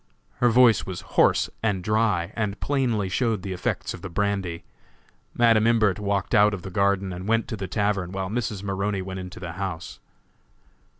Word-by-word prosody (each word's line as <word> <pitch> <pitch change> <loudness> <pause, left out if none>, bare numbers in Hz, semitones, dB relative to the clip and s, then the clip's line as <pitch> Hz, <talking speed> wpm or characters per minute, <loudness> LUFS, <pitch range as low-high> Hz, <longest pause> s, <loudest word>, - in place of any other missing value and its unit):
Her 120 - +3
voice 120 -2 +5
was 95 -2 -6
hoarse - - +4
and 100 -5 0
dry, 105 -5 +1
and 105 -2 -2
plainly 125 -8 0
showed 110 0 0
the 95 - -4
effects 90 - -2
of - - -9
the 95 - -6
brandy. 95 -2 -2 0.7
Madam 115 -2 +4
Imbert 110 -4 +3
walked 100 -1 -1
out 105 -1 +5
of 90 - -10
the 95 - -7
garden 100 -1 +1
and 90 +2 -7
went 115 +1 +1
to 115 - -3
the 95 -2 -5
tavern, 100 -2 -1
while 95 0 -3
Mrs. 105 -2 -3
Maroney 100 0 -2
went 95 0 -6
into 90 0 -8
the 90 -2 -6
house. 90 -2 -5
100 Hz, 180 wpm, -25 LUFS, 95-110 Hz, 0.7 s, voice